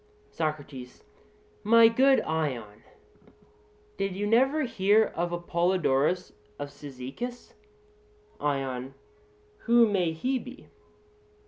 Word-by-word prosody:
SOCRATES: 145 Hz, -5 st, -5 dB, 0.6 s
My 230 Hz, +2 st, +7 dB
good 265 Hz, +4 st, +4 dB
Ion, 125 Hz, -10 st, -3 dB, 1.2 s
did 195 Hz, -1 st, -2 dB
you 205 Hz, +2 st, -2 dB
never 265 Hz, +8 st, +3 dB
hear 210 Hz, -2 st, +3 dB
of 175 Hz, +1 st, -2 dB
Apollodorus 175 Hz, -2 st, 0 dB, 0.2 s
of 145 Hz, -, -5 dB
Cyzicus? 145 Hz, -, -8 dB, 0.9 s
ION: 135 Hz, -2 st, -3 dB, 0.7 s
Who 235 Hz, -1 st, +5 dB
may 185 Hz, -5 st, +1 dB
he 255 Hz, +11 st, -1 dB
be? 255 Hz, +3 st, -12 dB
175 Hz, 90 wpm, -27 LUFS, 145-230 Hz, 1.2 s, My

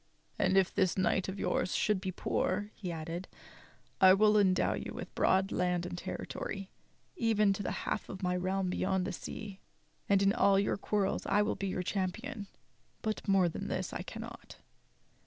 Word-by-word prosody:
"And 190 Hz, -, +3 dB
if 190 Hz, -1 st, +3 dB
this 190 Hz, -2 st, +2 dB
knight 190 Hz, 0 st, +2 dB
of 190 Hz, -, -5 dB
yours -, -, 0 dB
should 210 Hz, -3 st, +1 dB
be 190 Hz, -, -3 dB
poor," 205 Hz, +3 st, -1 dB
he 180 Hz, -4 st, -5 dB
added, 165 Hz, +2 st, -5 dB, 0.7 s
"I 190 Hz, 0 st, +9 dB
will 210 Hz, +1 st, +5 dB
endow 190 Hz, -3 st, +3 dB
you -, -, -5 dB
with -, -, -7 dB
broad 190 Hz, +1 st, +2 dB
land 180 Hz, -1 st, 0 dB
and 175 Hz, -, -5 dB
territory, 195 Hz, +2 st, -5 dB, 0.4 s
even 215 Hz, -, +3 dB
to 195 Hz, -, -4 dB
the 195 Hz, -, -3 dB
half -, -, -2 dB
of 190 Hz, 0 st, -7 dB
my 180 Hz, 0 st, +1 dB
realm 185 Hz, +1 st, 0 dB
beyond 190 Hz, 0 st, 0 dB
the 195 Hz, -, -2 dB
sea; 200 Hz, +1 st, -7 dB, 0.5 s
and 200 Hz, -1 st, +4 dB
in 195 Hz, 0 st, +4 dB
all 195 Hz, -1 st, +4 dB
your 200 Hz, -, +2 dB
quarrels 200 Hz, -1 st, -1 dB
I 210 Hz, -, +3 dB
will 210 Hz, -, 0 dB
be 195 Hz, -, -3 dB
your 185 Hz, -1 st, -2 dB
cham 185 Hz, 0 st, 0 dB
pion. 225 Hz, -1 st, -7 dB, 0.6 s
But 215 Hz, 0 st, -2 dB
more 195 Hz, -2 st, +4 dB
than 165 Hz, -, -4 dB
this -, -, -3 dB
I -, -, -3 dB
cannot." -, -, -8 dB
195 Hz, 185 wpm, -32 LUFS, 185-205 Hz, 0.7 s, I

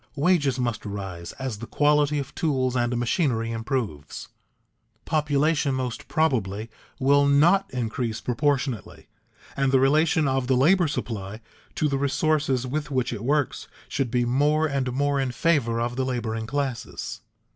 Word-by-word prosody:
Wages 145 Hz, -4 st, +2 dB
must 120 Hz, -3 st, -2 dB
rise 95 Hz, -4 st, -6 dB
as 130 Hz, -6 st, -5 dB
the 120 Hz, -, -7 dB
quality 150 Hz, 0 st, +2 dB
of 135 Hz, -1 st, -4 dB
tools 130 Hz, -5 st, 0 dB
and 120 Hz, 0 st, 0 dB
machinery 120 Hz, -2 st, 0 dB
improves. 115 Hz, -, -4 dB, 0.8 s
Population 150 Hz, -1 st, +1 dB
most 125 Hz, -3 st, -4 dB
probably 115 Hz, -9 st, 0 dB, 0.3 s
will 140 Hz, +2 st, +4 dB
not 170 Hz, +8 st, +4 dB
increase 115 Hz, -2 st, -2 dB
proportionately 130 Hz, -3 st, -2 dB, 0.5 s
and 135 Hz, -1 st, +1 dB
the 135 Hz, -, +5 dB
relation 150 Hz, +3 st, +3 dB
of 130 Hz, -1 st, 0 dB
the 130 Hz, -1 st, +3 dB
labor 175 Hz, +6 st, +4 dB
supply 110 Hz, -7 st, -4 dB, 0.4 s
to 155 Hz, -, +1 dB
the 140 Hz, -2 st, -1 dB
resources 140 Hz, -2 st, +1 dB
with 145 Hz, +3 st, -3 dB
which 130 Hz, -3 st, -1 dB
it 110 Hz, -2 st, -6 dB
works 145 Hz, +2 st, 0 dB, 0.2 s
should 135 Hz, -3 st, -1 dB
be 120 Hz, 0 st, +1 dB
more 145 Hz, +5 st, +2 dB
and 135 Hz, -4 st, -1 dB
more 140 Hz, +2 st, +1 dB
in 135 Hz, -1 st, 0 dB
favor 120 Hz, -5 st, +1 dB
of 120 Hz, +1 st, -2 dB
the 130 Hz, -, +1 dB
laboring 115 Hz, -3 st, -3 dB
classes. 135 Hz, -2 st, -4 dB
130 Hz, 145 wpm, -25 LUFS, 120-145 Hz, 0.8 s, the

